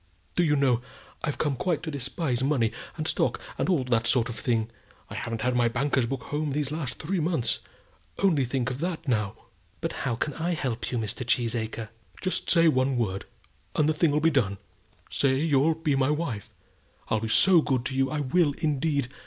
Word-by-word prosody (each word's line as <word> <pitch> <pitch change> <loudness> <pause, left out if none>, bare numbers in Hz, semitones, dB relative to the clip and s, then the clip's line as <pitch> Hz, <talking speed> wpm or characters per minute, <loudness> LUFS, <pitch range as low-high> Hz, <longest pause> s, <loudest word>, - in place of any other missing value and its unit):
Do 175 - +3
you 150 -3 +3
know, 130 -4 +3 0.4
I've 150 -3 -1
come 145 -3 0
quite 170 +4 -1
to 160 - -3
despise 135 -1 -2
money 130 -6 +2 0.3
and 155 -1 -2
stock, - - +1 0.2
and - - +1
all 165 -8 +3
that 115 -3 +1
sort 125 0 +2
of 120 - -5
thing. 115 -1 0 0.4
I - - -5
haven't 115 -1 -3
had 125 0 +1
my 120 -1 +4
banker's 130 +1 +1
book 130 -2 -3
home 150 +1 -2
these 145 -1 -1
last 150 -4 -3
three 180 +4 -1
months. 155 -8 0 0.6
Only 170 -8 +3
think 125 0 -1
of 125 - -5
that 165 -1 -3
now." 105 -6 0 0.4
"But - - -2
how 120 - -1
can 150 +5 -2
I 170 +3 -1
help 125 -6 -2
you, 125 - 0
Mr. 115 +2 -3
Cheesacre?" 115 -2 -1 0.3
"Just 185 - -2
say 170 -1 +5
one 130 -3 +2
word, 100 -5 -1 0.5
and 150 - +3
the 155 - +3
thing'll 150 -1 +2
be 165 +2 +3
done. 105 -9 +1 0.5
Say 135 -2 +2
you'll 150 +1 +3
be 155 -2 0
my 135 0 +2
wife? 130 -9 -2 0.6
I'll 110 - +2
be 110 0 -3
so 180 - +6
good 130 -4 0
to 130 - -2
you. 135 0 +2
I 150 -1 -1
will, 145 +2 +2
indeed. 145 -3 0
135 Hz, 200 wpm, -27 LUFS, 120-155 Hz, 0.6 s, so